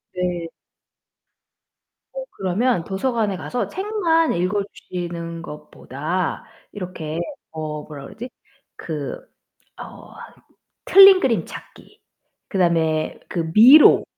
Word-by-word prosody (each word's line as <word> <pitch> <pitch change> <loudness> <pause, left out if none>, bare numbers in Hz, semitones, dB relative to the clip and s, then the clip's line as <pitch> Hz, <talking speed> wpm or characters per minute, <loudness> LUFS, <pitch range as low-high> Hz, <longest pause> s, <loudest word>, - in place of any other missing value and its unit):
네. 175 -2 -3 1.6
어 - - -5
그러면 195 +2 -1
도서관에 210 -1 -2
가서 245 +6 -4
책만 355 -4 0
읽어주시는 175 -3 -4
것보다 155 +2 -5 0.3
이렇게 175 -5 -6 0.3
어 155 -1 -6
뭐라 145 -3 -10
그러지? 240 - -9 0.5
그 150 -4 -6 0.6
어 - - -12 0.7
틀린 390 -1 +8
그림 240 -9 0
찾기. - - -13 0.5
그다음에 165 -4 0
그 165 -2 -3
미로. 260 +8 +8
180 Hz, 190 characters per minute, -21 LUFS, 165-245 Hz, 1.6 s, 틀린